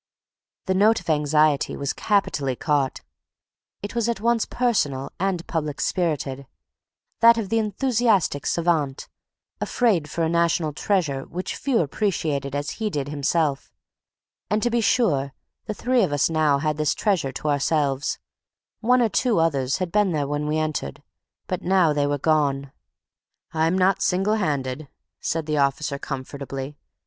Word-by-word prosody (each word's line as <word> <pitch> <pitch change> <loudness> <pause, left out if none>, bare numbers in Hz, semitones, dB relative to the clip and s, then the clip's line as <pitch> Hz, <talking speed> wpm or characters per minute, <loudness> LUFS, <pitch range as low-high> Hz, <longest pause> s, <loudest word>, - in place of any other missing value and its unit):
The 190 - +1
note 210 +4 +4
of - - -2
anxiety 150 -1 +2
was 140 0 -2
capitally 145 -10 0
caught; 145 -1 0 0.8
it 205 - -5
was 235 -1 0
at 235 - -1
once 235 +1 +1
personal 145 - 0
and 185 -2 -1
public 150 -3 -3
spirited, 140 -6 -1 0.7
that 230 0 +7
of 215 -4 -3
the 225 - +2
enthusiastic 215 - +1
savant, 160 -5 0 0.5
afraid 195 -11 +1
for 165 +3 -2
a - - +2
national 170 -2 +1
treasure 150 -6 -1
which 180 +2 -5
few 265 -7 +1
appreciated 145 -5 -1
as 145 +1 -2
he 215 - +1
did 145 -5 -3
himself. 145 0 -1 0.8
And, 210 +2 0
to 240 - +1
be 235 0 +2
sure, 145 - +1 0.3
the 215 - -3
three 250 +2 +2
of 185 - +1
us 145 +2 +1
now 155 -3 +3
had 150 +1 -1
this 155 -2 +1
treasury 190 -10 0
to 150 - -3
ourselves; 140 -1 0 0.6
one 245 +2 +3
or 225 - +2
two 240 -1 +1
others 140 -5 +1
had 185 -2 -3
been 205 -2 +2
there 145 -2 -1
when 145 +1 -2
we 155 +1 0
entered; 155 - -3 0.4
but 185 - -3
now 180 -4 +3
they 145 -1 +1
were 145 0 0
gone. 140 -2 +1 0.8
"I'm 165 +3 +1
not 190 +1 +2
single 195 +4 +1
handed," 145 -6 -2 0.3
said 165 -1 -2
the 150 -1 -1
officer, 140 +1 0
comfortably. 135 +1 -6
155 Hz, 155 wpm, -23 LUFS, 145-200 Hz, 0.8 s, that